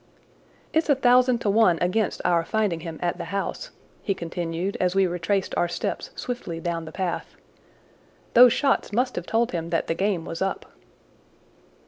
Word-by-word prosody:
"It's 320 0 +1
a 285 - +6
thousand 250 -1 +4
to 205 - 0
one 205 -5 +4
against 185 +4 0
our 170 -1 +3
finding 205 -3 0
him 165 -1 -7
at 175 - -1
the - - -4
house," 200 - -4 0.3
he 195 - -1
continued 170 +2 -3
as 180 0 +1
we 195 -1 +4
retraced 180 +2 -1
our 175 - +2
steps 175 - -4
swiftly 240 -10 -5
down 165 -1 -3
the 155 - -8
path. 175 -2 -4 1.0
"Those 245 0 +8
shots 275 -4 +1
must 250 +4 0
have 175 - -5
told 230 +1 +1
him 170 -1 -3
that 165 -1 0
the - - -1
game 185 -1 -1
was 165 - -6
up." 195 0 -2
185 Hz, 170 wpm, -25 LUFS, 170-225 Hz, 1.0 s, Those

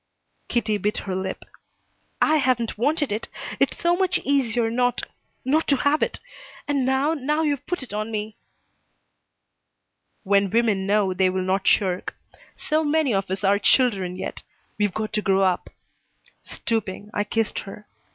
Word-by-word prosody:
Kitty 220 -3 0
bit 210 +2 -1
her 190 -2 -2
lip. 190 0 -4 0.8
"I 310 0 +4
haven't 250 -5 +1
wanted 290 +4 0
it. 215 +2 -2 0.3
It's - - +1
so 345 0 +3
much 365 -1 +1
easier 245 -5 +1
not 245 +1 +1 0.4
not 305 +5 +2
to 280 - +4
have 285 +3 +2
it. - - -1 0.5
And 280 -3 +1
now 270 +4 +2
now 300 +1 0
you've 290 -3 -1
put 355 -6 -2
it 250 - -10
on 215 +1 -2
me." 215 0 -4 1.9
"When 200 0 +3
women 210 -3 +1
know, 200 -2 +2
they 185 0 +2
will 185 0 -1
not 190 +1 0
shirk. 185 -3 +2 0.4
So 310 +1 0
many 300 -4 +2
of 195 -1 -1
us 190 +2 -3
are 200 +1 +3
children 200 -7 +2
yet. 185 - -5 0.4
We've 205 -1 +2
got 215 +2 -4
to 210 - +1
grow 195 -2 +2
up." 185 -2 +1 0.7
Stooping, 210 -2 -3
I 205 - +1
kissed 220 +1 -1
her. 210 +1 -9
220 Hz, 160 wpm, -24 LUFS, 195-275 Hz, 1.9 s, I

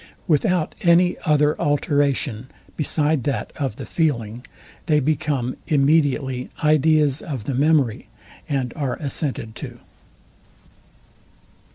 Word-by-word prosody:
Without 165 +1 +1
any 175 +1 +4
other 150 0 +3
alteration, 140 -4 0 0.3
beside 150 -2 +1
that 135 -8 -2
of 135 -7 -2
the - - -7
feeling, 120 -8 -1 0.4
they 150 -2 +4
become 140 -3 -1
immediately 140 -4 +1
ideas 150 -1 +3
of 135 -8 -5
the 135 - -3
memory, 140 -4 +1 0.4
and 130 -4 -1
are 140 -4 -2
assented 140 -6 -3
to. - - -8
145 Hz, 100 wpm, -22 LUFS, 130-155 Hz, 0.4 s, any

